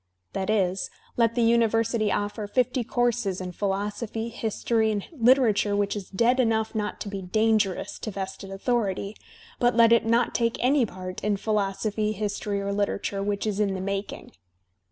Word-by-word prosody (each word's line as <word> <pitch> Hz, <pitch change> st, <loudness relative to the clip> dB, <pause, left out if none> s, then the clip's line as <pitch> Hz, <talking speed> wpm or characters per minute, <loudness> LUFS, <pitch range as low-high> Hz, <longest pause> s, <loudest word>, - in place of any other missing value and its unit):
That 190 Hz, +1 st, -2 dB
is, 190 Hz, -3 st, +1 dB, 0.3 s
let. 230 Hz, -1 st, +2 dB
the 240 Hz, -, +2 dB
university 230 Hz, -1 st, +2 dB
oflFer 205 Hz, 0 st, -2 dB
fifty 255 Hz, +1 st, +1 dB
courses 235 Hz, -5 st, 0 dB
in 185 Hz, -1 st, -5 dB
philosophy, 205 Hz, +4 st, -3 dB
history 225 Hz, 0 st, 0 dB
and 205 Hz, -2 st, -2 dB
literature 235 Hz, -7 st, +3 dB
which 205 Hz, 0 st, 0 dB
is 200 Hz, -3 st, -6 dB
dead 235 Hz, +6 st, +2 dB
enough 220 Hz, -3 st, +1 dB
not 210 Hz, -2 st, -3 dB
to -, -, -4 dB
be 200 Hz, -1 st, -4 dB
dangerous 215 Hz, 0 st, +1 dB
to -, -, -4 dB
vested 195 Hz, -1 st, -6 dB
authority, 200 Hz, -1 st, -1 dB, 0.4 s
but 245 Hz, -1 st, +3 dB
let 230 Hz, 0 st, +6 dB
it 235 Hz, -, +5 dB
not 235 Hz, +1 st, +2 dB
take 230 Hz, -1 st, +1 dB
any 255 Hz, 0 st, +3 dB
part 185 Hz, -1 st, -7 dB
in 205 Hz, 0 st, +1 dB
philosophy, 210 Hz, +1 st, -1 dB
history, 205 Hz, 0 st, -2 dB
or 200 Hz, 0 st, -2 dB
literature, 200 Hz, 0 st, -1 dB
which 200 Hz, +1 st, -1 dB
is 210 Hz, -1 st, -1 dB
in 200 Hz, -2 st, +1 dB
the -, -, -4 dB
making! 200 Hz, +1 st, -4 dB
210 Hz, 165 wpm, -26 LUFS, 200-230 Hz, 0.4 s, let